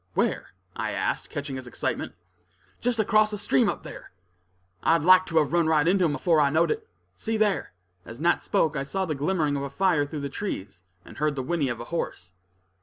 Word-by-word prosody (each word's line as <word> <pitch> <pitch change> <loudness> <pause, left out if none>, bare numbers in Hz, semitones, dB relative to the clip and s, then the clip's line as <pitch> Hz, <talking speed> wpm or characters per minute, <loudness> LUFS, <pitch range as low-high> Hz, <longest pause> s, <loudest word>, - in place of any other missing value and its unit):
"Where?" - - -1 0.2
I - - -2
asked, - - -2
catching 140 -2 -5
his 130 -1 -8
excitement. - - -3 0.7
"Just 245 -1 0
across 215 0 +3
the 210 - -4
stream 135 -9 +2
up - - -4
there; - - -10 0.7
I 165 - +4
liked 185 +3 +5
to 165 - -1
have 150 -1 +2
run 170 -2 +3
right 160 -1 +3
into 185 0 +3
him 150 -3 +1
afore 165 -4 +3
I 140 - +4
knowed 160 +4 +2
it. 445 0 -3 0.3
See 225 0 -2
there!" 210 -3 0 0.3
As 115 +6 -10
Nat 170 +2 +2
spoke, 160 -1 +1
I 135 - -1
saw 190 +7 -2
the 160 - -2
glimmering 150 0 0
of 140 - -2
a 140 - -4
fire 165 -2 +1
through 150 0 -5
the 140 - -2
trees, 100 - -5 0.2
and - - -13
heard 150 -1 +1
the 130 - -3
whinny 155 -2 0
of 120 - -4
a 120 - -6
horse. 90 - -4
160 Hz, 215 wpm, -26 LUFS, 140-185 Hz, 0.7 s, liked